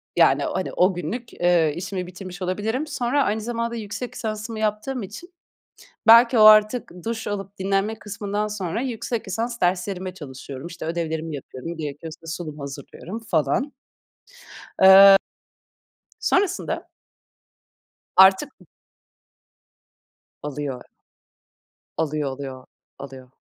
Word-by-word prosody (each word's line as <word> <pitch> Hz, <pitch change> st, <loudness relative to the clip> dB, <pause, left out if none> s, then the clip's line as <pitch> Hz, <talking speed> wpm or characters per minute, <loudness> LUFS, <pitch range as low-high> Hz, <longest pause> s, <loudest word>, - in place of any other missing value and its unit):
yani, -, -, +4 dB
hani, 185 Hz, -, -3 dB
o 185 Hz, +2 st, +3 dB
günlük, 190 Hz, +8 st, -5 dB
eee, 175 Hz, -3 st, +2 dB
işimi 185 Hz, +1 st, -4 dB
bitirmiş 180 Hz, 0 st, -9 dB
olabilirim. 215 Hz, +10 st, -2 dB
Sonra 280 Hz, -1 st, 0 dB
aynı 220 Hz, -2 st, -1 dB
zamanda 235 Hz, +1 st, -3 dB
yüksek 225 Hz, +2 st, -6 dB
lisansımı 220 Hz, -1 st, -4 dB
yaptığım 215 Hz, +3 st, -2 dB
için 340 Hz, -, -10 dB, 0.7 s
belki 235 Hz, +2 st, +8 dB
o -, -, +7 dB
artık 215 Hz, +3 st, +6 dB
duş 230 Hz, 0 st, -3 dB
alıp 200 Hz, -1 st, -5 dB
dinlenme 195 Hz, +3 st, 0 dB
kısmından 205 Hz, 0 st, -3 dB
sonra 210 Hz, +1 st, -3 dB
yüksek 235 Hz, -3 st, -3 dB
lisans 230 Hz, +4 st, -3 dB
derslerime 185 Hz, +1 st, -1 dB
çalışıyorum. 135 Hz, -2 st, -9 dB
İşte, 170 Hz, -2 st, -8 dB
ödevlerimi 160 Hz, -2 st, -3 dB
yapıyorum, 140 Hz, +5 st, -8 dB
gerekiyorsa 160 Hz, +2 st, -7 dB
sunum 160 Hz, -2 st, -6 dB
hazırlıyorum 140 Hz, +8 st, -8 dB
falan. 215 Hz, -, 0 dB, 1.1 s
Eee 195 Hz, +1 st, +9 dB, 1.0 s
sonrasında 385 Hz, -2 st, 0 dB, 1.3 s
artık, 190 Hz, +9 st, +6 dB
b -, -, -17 dB, 1.8 s
Alıyor. 145 Hz, -3 st, -4 dB, 1.2 s
Alıyor, 150 Hz, -2 st, -1 dB
alıyor, 130 Hz, -1 st, -8 dB, 0.3 s
alıyor. 130 Hz, -2 st, -10 dB
195 Hz, 105 wpm, -23 LUFS, 165-225 Hz, 1.8 s, Eee